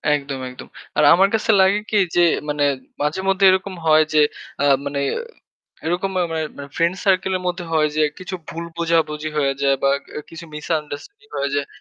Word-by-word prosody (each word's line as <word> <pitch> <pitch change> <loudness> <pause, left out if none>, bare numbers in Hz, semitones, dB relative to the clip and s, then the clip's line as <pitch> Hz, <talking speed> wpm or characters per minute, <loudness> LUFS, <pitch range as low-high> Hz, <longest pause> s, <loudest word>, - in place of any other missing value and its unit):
একদম, 140 -2 -4
একদম। 125 - -11 0.3
আর - - +4
আমার 190 +3 +5
কাছে 220 +1 +2
লাগে 190 +2 +4
কি, 215 - +1 0.2
যে 175 - +5 0.3
মানে 145 0 0 0.4
মাঝেমধ্যে 190 +6 +1
এরকম 190 +1 -1
হয় 155 0 +6
যে, 155 - +5 0.7
মানে 140 0 -2 0.9
এরকম 180 +4 0
মা - - +2
মানে 160 -1 -1
মানে 140 0 -8
ফ্রেন্ড 170 +2 +1
সার্কেলের 190 -1 +2
মধ্যে 180 0 -2
হয় 155 -1 +3
যে, 155 - +3 0.2
কিছু 185 +1 -6
ভুল 170 +1 -5
বোঝাবুঝি 160 -2 0
হয়ে 140 -2 +2
যায় 140 -1 +3
বা 140 - +4 0.3
এ - - -4
কিছু 165 +1 -9
misunderstanding 155 - -5
হয়ে 140 0 -1
যায়। 145 0 0
165 Hz, 175 wpm, -21 LUFS, 150-185 Hz, 0.9 s, হয়